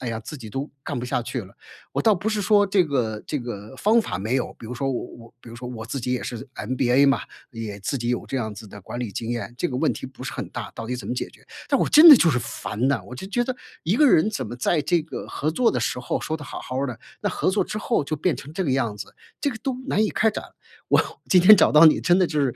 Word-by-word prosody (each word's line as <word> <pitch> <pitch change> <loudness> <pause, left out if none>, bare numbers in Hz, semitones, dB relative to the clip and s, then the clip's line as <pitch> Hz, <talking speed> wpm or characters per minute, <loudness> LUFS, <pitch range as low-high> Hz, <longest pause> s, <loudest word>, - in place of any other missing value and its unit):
哎 125 - -4
呀， 115 -1 -3
自 115 +8 -9
己 115 -6 -9
都 135 +7 -4
干 - - -4
不 120 - -4
下 125 - -1
去 120 0 -4
了。 95 - -15 0.4
我 - - -1
倒 220 -2 +4
不 195 +3 -6
是 215 -1 +1
说 205 0 +4
这 190 -3 +3
个 115 -7 -1
这 150 - -2
个 115 -1 -7
方 220 - +4
法 100 - -4
没 110 +7 -1
有， 130 - -2
比 - - -12
如 115 - -6
说 135 +2 -2
我 125 - -3
我 115 -1 -14
比 115 - -12
如 - - -10
说 125 +1 -7
我 115 -3 -7
自 130 +3 -4
己 125 - -3
也 125 - -1
是 120 - -5 0.2
MBA 130 +4 +2
嘛， 135 - +3 0.3
也 110 -3 -6
自 140 +8 -2
己 120 0 -3
有 125 - -1
这 135 - -2
样 110 -3 -4
子 110 +1 -10
的 100 0 -11
管 120 - -7
理 120 -5 -4
经 115 - -4
验， 120 -1 -4
这 175 - 0
个 125 - -4
问 - - +2
题 - - -7
不 130 0 -11
是 - - -4
很 - - -5
大， - - -7
到 115 - -6
底 125 - -3
怎 125 - -8
么 - - -2
解 125 - -3
决。 - - -21 0.2
但 - - +3
我 - - +2
真 325 +2 +9
的 290 - +12
就 170 - +4
是 125 - +1
烦 115 +1 -3
呐， 130 -9 0
我 120 - -9
就 130 - -7
觉 240 +5 0
得 255 - -3 0.3
一 175 +6 +1
个 295 +4 +5
人 210 +3 +4
怎 130 - -3
么 120 - -7
在 150 +6 +1
这 170 +1 +1
个 160 - -7
合 155 - -2
作 235 +8 +2
的 125 - -1
时 125 +1 -2
候 - - -2
说 160 - -3
得 155 - -6
好 - - -7
好 130 +1 -4
儿 140 - 0
的， 120 -3 -6 0.2
那 205 - 0
合 185 - 0
作 205 - +1
之 - - -5
后 215 -5 0
就 155 +2 -3
变 165 +2 +1
成 145 - -9
这 190 - -1
个 145 - 0
样 115 -6 0
子， 100 -1 -9 0.2
这 285 - 0
个 220 - -7
都 265 +2 -3
难 215 - +1
以 215 - +2
开 220 0 +2
展。 - - -5 0.5
我 - - +4 0.3
今 180 -2 +5
天 210 +4 +10
找 200 - +4
到 150 +2 +7
你， 155 - +6
真 175 +1 +3
的 185 - +4
就 155 -2 -1
是 135 -4 0
130 Hz, 335 characters per minute, -24 LUFS, 120-180 Hz, 0.5 s, 的